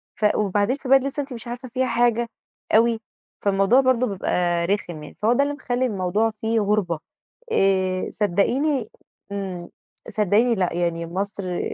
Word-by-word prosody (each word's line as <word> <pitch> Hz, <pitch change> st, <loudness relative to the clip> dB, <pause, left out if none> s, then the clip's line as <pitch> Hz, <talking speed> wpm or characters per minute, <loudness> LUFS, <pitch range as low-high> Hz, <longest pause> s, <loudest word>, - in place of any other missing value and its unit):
ف 215 Hz, -, -1 dB
وبعدين 205 Hz, +4 st, +1 dB
في 270 Hz, -2 st, -8 dB
بلد 270 Hz, -1 st, +6 dB
أنتِ -, -, -1 dB
لسه 290 Hz, +1 st, -3 dB
أنتِ 275 Hz, -1 st, -7 dB
مش 235 Hz, 0 st, -7 dB
عارفة 245 Hz, +2 st, -6 dB
فيها 255 Hz, +2 st, -1 dB
حاجة 235 Hz, 0 st, +2 dB, 0.5 s
أوي، 230 Hz, 0 st, +4 dB, 0.4 s
فالموضوع 200 Hz, +6 st, +4 dB
برضه 255 Hz, -1 st, +2 dB
بيبقى 175 Hz, -3 st, 0 dB
رخم 175 Hz, -5 st, -2 dB
يعني، -, -, -11 dB
فهو 220 Hz, +3 st, +3 dB
ده 280 Hz, +3 st, +3 dB
اللي 290 Hz, 0 st, -1 dB
مخلّي 255 Hz, -2 st, -1 dB
الموضوع 210 Hz, +1 st, 0 dB
فيه 220 Hz, +1 st, -1 dB
غربة. 200 Hz, -6 st, 0 dB, 0.5 s
آآ 190 Hz, -, +2 dB
صدقيني 230 Hz, -, +1 dB, 0.4 s
امم، 190 Hz, -3 st, -5 dB, 0.4 s
صدقيني 215 Hz, +4 st, +2 dB
لأ 185 Hz, -4 st, 0 dB
يعني 170 Hz, -1 st, -1 dB
مصر 190 Hz, 0 st, -3 dB
210 Hz, 160 wpm, -23 LUFS, 190-245 Hz, 0.5 s, بلد